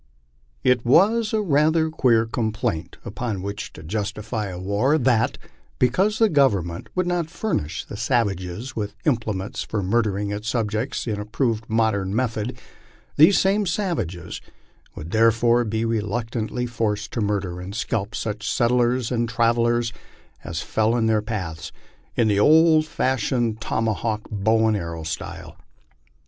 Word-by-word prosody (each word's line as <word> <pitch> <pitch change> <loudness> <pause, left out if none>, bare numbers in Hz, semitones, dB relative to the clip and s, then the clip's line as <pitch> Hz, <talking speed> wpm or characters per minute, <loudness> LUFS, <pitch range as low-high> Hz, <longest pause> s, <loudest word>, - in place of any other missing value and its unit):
It 125 -2 +3
was 210 - +4
rather 160 -6 +2
a 160 - -3
queer 115 -7 +3
complaint 110 -7 -2
upon 110 -3 -4
which 100 +1 -5
to 80 - -11
justify 105 +4 -3
a 90 -2 -6
war 100 - +1
that, 120 -5 +2 0.4
because 190 - +2
the 225 - +5
Government 100 - +1
would 185 -1 +1
not 175 -2 -1
furnish 165 - -3
the - - -8
sav 115 +1 +2
ages 95 +6 -6
with 105 -1 -4
implements 110 -8 -1
for 105 -3 -3
murdering 100 0 0
its 105 +2 -3
subjects 115 +2 -1
in 105 -3 -2
approved 110 +1 -2
modern 110 -3 +1
method, 115 -1 -1 0.6
these 160 +7 +6
same 200 +1 +2
savages 165 - -3 0.5
would 80 +3 -8
therefore 115 +2 +4
be 110 0 -1
reluctantly 115 +2 -2
forced 110 -3 -2
to 115 - -1
murder 100 -4 -1
and 95 +3 -7
scalp 105 -2 -2
gueh 105 -1 -3
settlers 120 +1 +1
and 120 -1 0
travellers 115 0 +2 0.5
as 85 0 -4
fell 110 +1 +1
in 115 -2 +1
their 110 -1 +2
paths, 95 -7 -5 0.4
in 115 - +3
the 100 -1 +2
old 155 +4 +5
fashioned 120 -5 0
toma 110 0 0
hawk, 110 0 -2
bow 110 +2 +2
and 110 -1 +2
arrow 85 -3 -5
style. 80 - -6
115 Hz, 145 wpm, -23 LUFS, 105-125 Hz, 0.6 s, these